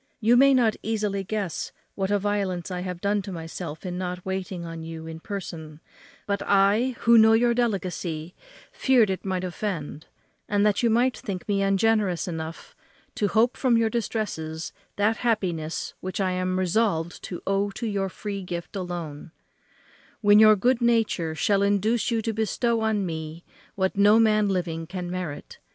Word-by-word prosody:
You 230 +1 +4
may 275 +2 +6 0.3
easily 210 -3 -1
guess 195 -4 -3 0.2
what 195 -1 -2
a 205 - +3
violence 195 -3 -2
I 180 - -3
have 180 -1 -5
done 205 0 +1
to 195 0 -7
myself 165 -1 -7
in 180 0 -4
not 180 -1 -4
waiting 190 -2 -4
on 165 -1 -7
you 160 0 -7
in 160 0 -7
person; 165 -5 -7 0.5
but 200 0 -1
I, 205 +6 +3
who 235 0 +6
know 220 0 +7
your 235 +1 +4
delicacy, 185 -8 -2 0.4
feared 245 -7 +3
it 190 - -4
might 185 -2 -2
offend, 175 -5 -4 0.4
and 205 0 +2
that 210 -3 +2
you 235 - +3
might 245 +3 +2
think 190 -4 -6
me 200 -1 +1
ungenerous 195 -2 +2
enough 160 -1 -6 0.4
to 205 - 0
hope 230 +4 +2
from 250 -3 +2
your 225 -1 +2
distresses 170 -9 -3 0.2
that 215 +2 +2
happiness 175 -9 -1
which 185 +2 -5
I 190 -1 +1
am 185 0 -1
resolved 185 -3 0
to 175 - -7
owe 195 +1 +1
to 215 +4 -6
your 200 -3 -1
free 200 +1 -5
gift 175 -1 -6
alone, 175 -5 -5 0.9
when 205 -1 +6
your 215 0 +8
good 245 +5 +1
nature 225 -9 +1
shall 200 +5 +2
induce 205 +4 +1
you 225 -2 0
to 225 - -1
bestow 225 +2 0
on 215 -3 +1
me 160 0 -6 0.3
what 190 -1 0
no 205 +2 +6
man 215 -2 +3
living 170 -4 -2
can 180 0 -5
merit. 180 -5 -6
195 Hz, 170 wpm, -25 LUFS, 175-220 Hz, 0.9 s, your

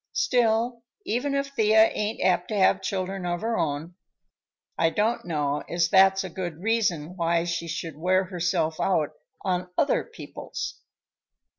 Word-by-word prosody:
Still, 235 - +1 0.2
even 270 +5 -1
if 275 0 -1
Thea 220 -4 +4
ain't 210 +1 -2
apt 180 -1 +2
to 215 - -2
have 190 - +4
children 190 0 -3
of 175 -1 -2
her 230 +1 -1
own, 155 +1 -2 0.8
I 165 - +3
don't 215 +5 0
know 150 -3 -1
as 170 0 +1
that's 190 +1 +5
a 185 - -5
good 175 -3 -5
reason 195 -8 0
why 170 -1 +1
she 170 -1 -3
should 160 -1 -4
wear 185 +4 +2
herself 170 -3 -1
out 160 -6 +1 0.3
on 180 -1 -1
other 290 - +2
people's." 460 - -7
185 Hz, 150 wpm, -26 LUFS, 170-220 Hz, 0.8 s, that's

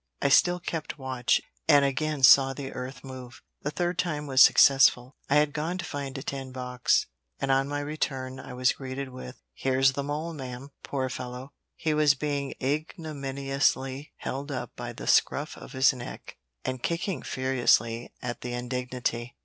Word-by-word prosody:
I 140 - +2
still 175 +5 +5
kept 165 -4 -4
watch, 130 -3 +1 0.3
and 145 -3 +6
again 145 +1 -1
saw 135 +1 +8
the 135 0 -6
earth 125 0 -7
move 130 -2 -10 0.2
the 150 - -2
third 175 +3 -2
time 150 -4 -1
was 135 -2 +4
successful. 130 -1 +6
I 140 - +3
had 150 -1 +3
gone 160 +4 -2
to 185 - -4
find 140 -2 -5
a 135 - -6
tin 135 -1 -5
box, 125 -1 +1 0.3
and 135 -1 0
on 135 +1 +3
my 145 0 -2
return 135 -3 -3
I 125 - -9
was 125 0 +2
greeted 135 0 -6
with 125 - -9
"Here's 135 - +2
the 140 - -3
mole, 150 +4 -3
ma'am!" 130 -1 -7
Poor 130 -2 -2
fellow! 125 +2 -7 0.2
he 155 - -1
was 150 -2 +4
being 140 -1 -2
ignominiously 140 -2 -1
held 140 +3 -5
up 130 -3 -5
by - - -5
the - - -9
scruff - - +2
of - - -11
his 130 +1 +4
neck, 120 -2 -9 0.3
and 130 -1 -3
kicking 170 0 -2
furiously 120 -3 +1
at 120 -1 -4
the 125 0 -4
indignity. 125 -1 -3
135 Hz, 170 wpm, -27 LUFS, 130-145 Hz, 0.3 s, saw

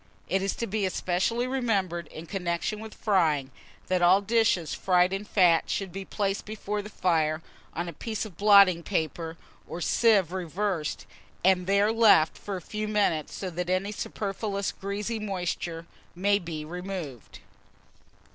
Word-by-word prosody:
IT 190 +1 +1
IS 195 0 -1
TO 235 - -2
BE 210 -1 -2
ESPECIALLY 190 +5 0
REMEMBERED, 200 -10 -1
in 160 - -9
connection 180 +3 -2
with 220 0 -9
frying, 155 -10 +1 0.3
that 185 -1 0
all 180 +3 +6
dishes 210 -5 +1
fried 180 0 +2
in 195 +1 -2
fat 180 -5 +3
should 195 -2 -2
be 195 +2 -5
placed 195 +1 -2
before 210 -1 -4
the 210 - -9
fire 160 -5 0 0.3
on 170 +1 -2
a 170 - -6
piece 220 +8 -4
of 200 -6 -10
blotting 200 -3 +6
paper, 165 -2 -3 0.3
or 170 - -6
sieve 195 0 +3
reversed, 180 - -2 0.4
and 185 -1 +3
there 200 +2 +3
left 220 -8 +5
for 200 - -6
a 185 - -5
few 215 +4 -4
minutes, 200 -8 0
so 185 -2 -4
that 175 +1 -3
any 185 +3 0
superfluous 200 -1 -3
greasy 205 +3 -4
moisture 175 -4 -3 0.3
may 200 +3 +2
be 165 -4 -6
removed. 175 - -7
190 Hz, 155 wpm, -27 LUFS, 170-205 Hz, 0.4 s, all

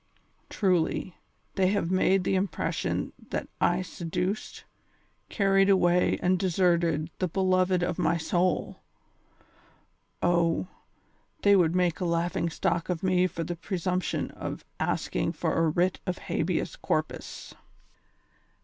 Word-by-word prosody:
Truly, 180 -2 0 0.4
they 190 -1 +2
have 195 -3 0
made 185 0 +3
the 195 - 0
impression 190 +1 -1 0.2
that - - -3 0.2
I 175 +1 -1
seduced, 180 +3 -4 0.7
carried 195 -1 +3
away 180 -2 +3
and 185 0 +3
deserted 170 -4 +1
the 185 - +1
beloved 185 0 +2
of 175 - -2
my 165 +2 +2
soul. 175 +3 -1 1.4
Oh, 170 0 +2 0.8
they 200 0 +6
would 175 -3 +3
make 175 -3 +1
a 180 - -1
laughing 170 0 0
stock 165 +1 -1
of 180 -1 -2
me 185 -1 +3
for 170 - -5
the 175 - -4
presumption 180 +1 -2
of - - -6
asking - - -1
for - - -1
a 165 -1 +2
writ 175 +3 +1
of 180 - -1
habeas - - -2
corpus." - - -3
180 Hz, 120 wpm, -28 LUFS, 170-185 Hz, 1.4 s, they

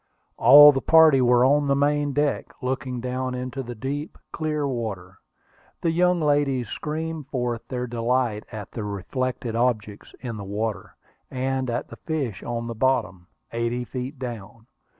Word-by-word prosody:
All 145 +1 +9
the 135 -2 -2
party 160 -4 +6
were 125 0 +4
on 145 +2 +3
the 140 - +3
main 145 +1 +1
deck, 145 +1 -1
looking 130 -1 -3
down 130 +1 -3
into 125 +2 -4
the 120 -1 -7
deep, 145 +7 -5
clear 150 -2 -2
water. 105 -8 -5 0.6
The 165 - +1
young 180 +1 +2
ladies 145 -6 +1
screamed 155 +1 -4
forth 120 -3 -3
their 125 -1 -3
delight 120 -2 -1
at 105 -4 -8
the 110 - -5
reflected 115 +4 -3
objects 110 -4 -2
in 120 -4 -6
the 100 - -6
water, 105 +2 -4 0.3
and 130 0 -2
at 120 +1 -2
the - - -10
fish 140 - -3
on 115 -1 -4
the 115 - -4
bottom, 110 -7 0 0.2
eighty 115 +1 -2
feet 130 +3 -6
down. 115 -3 -8
125 Hz, 155 wpm, -24 LUFS, 115-140 Hz, 0.6 s, All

